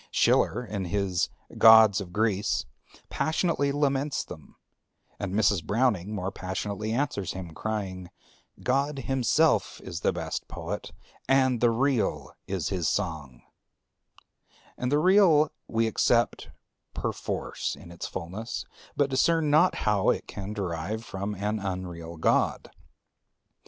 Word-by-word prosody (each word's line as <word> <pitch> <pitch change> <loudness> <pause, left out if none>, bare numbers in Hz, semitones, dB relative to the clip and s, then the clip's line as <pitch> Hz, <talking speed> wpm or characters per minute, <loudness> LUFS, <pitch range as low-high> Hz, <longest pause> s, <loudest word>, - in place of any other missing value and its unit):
Schiller 125 - +2
in 100 -4 -4
his 95 0 0 0.3
"Gods 110 -2 +8
of 90 -3 -8
Greece" 105 0 0 0.5
passionately 155 -3 0
laments 140 0 0
them; - - -12 0.6
and 100 -2 -3
Mrs. 100 -5 +2
Browning 105 0 0
more 95 -1 -3
passionately 100 +4 -4
answers 115 - -1
him, 90 -3 -7
crying, 95 -2 -4 0.5
"God 140 +3 +1
himself 135 +4 +1
is 85 - -6
the - - +1
best - - -4
Poet, - - -6 0.4
and 130 -3 +3
the 120 - +5
Real 115 - 0
is 95 -5 -2
his 90 -4 0
song 80 -10 -3 1.3
and 125 +1 -2
the 145 - +4
Real 165 -3 +5 0.2
we 115 0 +1
accept 115 +2 +1 0.5
perforce - - -3
in 85 - -13
its 85 - -6
fulness, 100 +8 -5 0.3
but 145 - +3
discern 150 +3 +2
not 165 +5 +5
how 105 -2 +3
it - - 0
can 100 +1 -7
derive 100 +2 -3
from 100 +1 -4
an 105 +2 -2
unreal 90 -4 -5
God. 80 - +1
105 Hz, 125 wpm, -27 LUFS, 95-135 Hz, 1.3 s, Gods